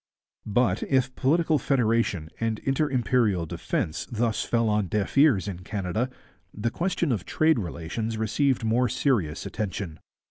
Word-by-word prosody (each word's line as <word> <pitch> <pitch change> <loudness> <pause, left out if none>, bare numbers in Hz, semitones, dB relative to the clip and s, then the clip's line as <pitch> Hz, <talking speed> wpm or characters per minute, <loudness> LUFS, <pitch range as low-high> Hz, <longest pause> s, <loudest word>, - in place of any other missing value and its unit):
But, 120 +4 +2
if 130 -1 +1
political 155 +3 +2
federation 115 - +1
and 115 -1 0
inter 135 +3 +1
imperial 115 -7 +1
defence 80 +1 -3
thus 115 -1 0
fell 115 -1 +1
on 105 -2 +1
deaf 100 +2 -2
ears 135 -9 +5
in 95 -3 -5
Canada, 100 +5 -2 0.4
the 110 +3 -2
question 170 -2 0
of 105 -7 -1
trade 155 +1 +2
relations 100 +5 -4
received 125 +4 +1
more 115 +2 +2
serious 105 - 0
attention. 95 -6 -4
115 Hz, 140 wpm, -26 LUFS, 100-130 Hz, 0.4 s, ears